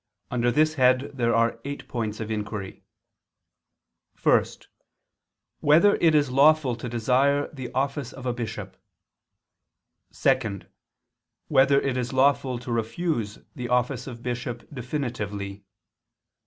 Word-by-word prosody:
Under 120 0 +1
this 155 +5 +3
head 130 +2 +3
there 120 -3 +1
are 115 0 +2
eight 140 +1 -6
points 110 -3 -3
of 110 0 -4
inquiry: 105 -2 -5 1.4
(1) - - +4 1.2
Whether 170 +8 +5
it 160 -2 +4
is 145 -3 +2
lawful 140 -1 +4
to 120 +1 -6
desire 130 +5 +2
the 130 -4 -7
office 135 -1 -1
of 130 -1 -10
a 125 - 0
bishop? 120 -2 -6 1.4
(2) 120 -8 0 0.9
Whether 140 +1 +5
it 135 -2 -1
is 125 +1 -3
lawful 130 -1 +2
to 120 0 -7
refuse 115 -1 -2 0.2
the 120 -2 -5
office 125 +1 0
of 120 -2 -9
bishop 120 -1 -4
definitively? 110 -7 -4
125 Hz, 120 wpm, -25 LUFS, 115-140 Hz, 1.4 s, Whether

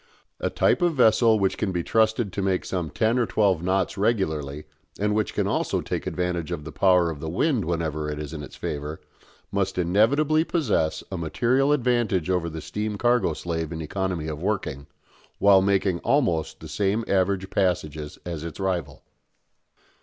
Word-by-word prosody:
A - - -1
type - - +2
of 175 -2 +2
vessel 115 -2 +5
which 95 -2 0
can 105 - 0
be 90 -2 -2
trusted 110 -1 +1
to 100 - -2
make 95 -1 0
some 90 -4 -2
ten 115 +8 +1
or 120 - +1
twelve 95 -6 +2
knots 95 +1 0
regularly, 80 -10 0 0.4
and 105 +1 +1
which 105 -3 -1
can - - +1
also - - 0
take - - -4
advantage 90 -3 -2
of 75 - -4
the 80 - -7
power 90 -2 +3
of 75 - -8
the 80 - -4
wind 115 - +1
whenever 80 -2 -2
it 75 - -4
is 75 +1 -6
in 75 - -5
its 70 - -10
favour, 75 +1 -5 0.5
must 95 -1 -1
inevitably 130 - +3
possess 90 - 0
a 95 - -3
material 125 - +1
advantage 120 - +1
over 90 -2 0
the 80 0 -6
steam 105 0 -3
cargo 120 -7 +2
slave 80 0 -4
in 80 - -5
economy 90 0 -2
of 75 -1 -5
working, 90 -8 -2 0.5
while 100 -1 +6
making 95 -2 +1
almost 115 - 0
the 80 - -8
same 100 +8 0
average 95 0 +1
passages 80 -6 -1
as 85 -3 -5
its 85 +1 -7
rival. 90 -7 -2
95 Hz, 175 wpm, -25 LUFS, 80-105 Hz, 0.5 s, while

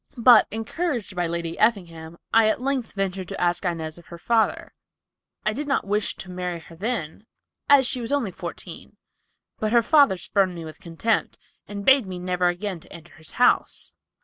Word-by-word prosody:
But, 240 +1 +7
encouraged 225 - -3
by 175 -1 0
Lady 170 0 -4
Effingham, 170 -7 0 0.2
I 225 -1 +6
at 215 - 0
length 265 -2 -2
ventured 195 -2 -3
to - - -6
ask 175 +1 0
Inez 165 -2 -3
of 170 - -18
her 170 - -10
father. 225 +5 0 0.7
I 215 - +1
did 290 +5 -4
not 275 - 0
wish 205 +1 -1
to 185 - -9
marry 180 -1 -4
her 165 0 -14
then, 205 -1 -4 0.4
as 280 -2 +7
she 250 0 0
was 230 - -4
only 275 -9 0
fourteen, - - -9 0.6
but 215 0 -1
her 235 -1 +5
father 280 -7 +5
spurned 185 +1 0
me 165 -1 -7
with 155 - -10
contempt, 175 +7 -1 0.3
and 200 -1 -6
bade 265 -5 +5
me 185 -1 -5
never 180 0 0
again 180 +1 -2
enter 170 0 -13
his 160 -2 -7
house. 245 - +2
195 Hz, 180 wpm, -24 LUFS, 175-230 Hz, 0.7 s, But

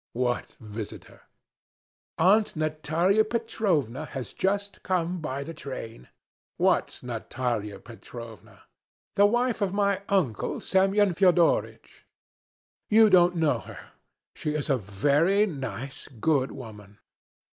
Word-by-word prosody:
"What 125 0 -2
visitor?" 110 -1 -8 1.0
"Aunt 205 +6 +4
Natalya 155 +6 +1
Petrovna 195 - -1
has 135 -6 -7
just 200 +1 -1
come 180 -1 -1
by 140 -2 -3
the 165 - -7
train." 120 - -8 0.5
"What - - +1
Natalya 115 -3 -3
Petrovna?" 115 -2 -12 0.5
"The 205 +1 +6
wife 240 +1 0
of 195 -2 0
my 200 -1 +1
uncle 160 - 0
Semyon 195 0 +2
Fyodoritch. 175 -1 +1 0.8
You 220 0 +6
don't 180 -1 +5
know 160 -3 +2
her. - - -12 0.4
She 150 0 -3
is 150 -1 -1
a 135 - +3
very 145 - +2
nice, 135 - -6
good 135 +2 0
woman." 105 -6 -11
155 Hz, 110 wpm, -27 LUFS, 125-195 Hz, 1.0 s, The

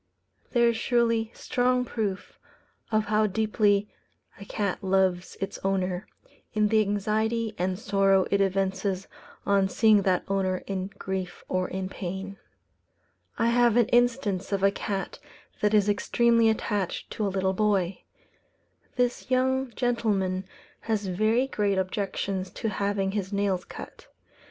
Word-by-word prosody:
There 235 -1 +4
is 230 - -1
surely 230 -2 +1
strong 250 0 +1
proof 210 -5 -4 0.5
of 215 -1 +2
how 215 +1 +2
deeply 210 0 +2 0.5
a 200 - -9
cat 200 -2 -2
loves 190 -1 +1
its 195 - -4
owner, 190 -1 -1 0.5
in 210 -1 +3
the 220 0 +4
anxiety 215 +2 0
and 185 +1 0
sorrow 195 -2 +3
it 200 - +3
evinces 195 0 0 0.4
on 200 -1 +3
seeing 215 0 +4
that 185 -2 +1
owner 190 -2 0
in 190 -1 -3
grief 190 -1 -4
or 185 0 0
in 190 0 -4
pain. 195 +1 -6 1.0
I 230 - +2
have 240 -1 +4
an 235 -3 +4
instance 240 -6 +1
of 195 -1 0
a 195 - +5
cat 195 -2 -4 0.4
that 210 - +2
is 205 -1 +4
extremely 230 +2 +3
attached 205 -4 -2
to 210 - -1
a - - 0
little 190 0 0
boy. 195 -3 +1 0.9
This 245 0 -1
young 260 +1 +1
gentleman 200 -6 0 0.4
has 215 -2 0
very 215 +7 +2
great 205 -7 0
objections 190 0 -2
to 225 - -1
having 200 -1 -1
his 195 -1 -3
nails 200 -2 0
cut. - - -10
200 Hz, 135 wpm, -27 LUFS, 190-220 Hz, 1.0 s, a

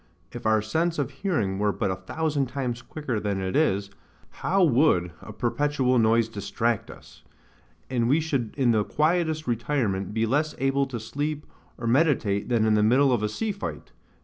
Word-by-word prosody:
If - - -5
our 110 -1 +3
sense 165 +9 0
of 145 -1 -1
hearing 135 - -1
were 105 0 +2
but 95 - -1
a - - -1
thousand 145 +9 -2
times 125 -2 -3
quicker 130 -5 -4
than 100 -2 -2
it 95 0 -3
is, 100 -10 +1 0.5
how 190 +1 +2
would 125 - +3
a - - -9
perpetual 130 +3 +1
noise 115 0 +3
distract 115 +1 -2
us. - - -14 0.7
And 120 -2 0
we 145 +5 +4
should 140 -8 -2
in 130 -4 +3
the 110 -2 +2
quietest 160 - 0
retirement 115 -6 -1
be 110 +1 0
less 150 +6 0
able 135 +1 +1
to 120 -3 -5
sleep 145 +7 -4 0.3
or 120 - -6
meditate 120 -6 +2
than 115 -3 +2
in 110 - +3
the 105 - +3
middle 130 +5 +4
of 120 - +1
a 105 - 0
sea 220 - -2
fight. 200 - -7
120 Hz, 180 wpm, -26 LUFS, 110-150 Hz, 0.7 s, we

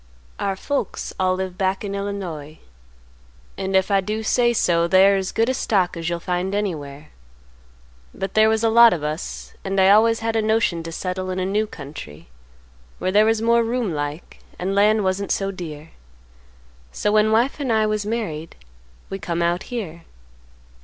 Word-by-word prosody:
"Our 195 -1 -1
folks 275 +2 -3
all 185 0 +2
live 185 -1 -5
back 190 +1 0
in 200 -1 -4
Illinois. 185 -7 -5 1.0
And 190 0 -3
if 190 +2 +2
I 195 -1 +4
do 215 +3 -3
say 240 +2 +3
so, 170 -7 +2
they 190 +2 +6
are 200 - +4
as 190 -1 -2
good 230 +4 +1
stock 190 -7 +1
as 165 0 -3
you'll 170 0 -2
find 180 +2 -2
anywhere. 155 -8 -4 1.0
But 195 -1 -5
there 215 0 +5
was 220 0 +1
a 225 - +4
lot 235 +1 +7
of 160 -4 -4
us, 150 +2 -5
and 195 0 -1
I 190 +1 +6
always 225 +2 +4
had 225 0 -1
a 225 - +2
notion 215 -6 +1
to 165 0 -7
settle 185 +2 -4
in 185 - -3
a 185 - -1
new 210 +3 0
country 135 - -10 0.7
where 185 - -1
there 210 +2 +5
was 225 0 +1
more 235 0 +4
room 230 -5 -1
like 145 +2 -5 0.2
and 190 +2 -2
land 210 +1 +3
wasn't 190 +1 -1
so 195 0 0
dear; 160 -4 -8 1.0
so 205 - -1
when 215 0 +3
wife 240 +7 +2
and 270 -4 -1
I 220 -1 +3
was 215 -1 -1
married 200 -8 -4 0.6
we 195 - -4
come 170 -2 -2
out 175 +2 +1
here. 190 -9 -5
195 Hz, 180 wpm, -22 LUFS, 175-215 Hz, 1.0 s, lot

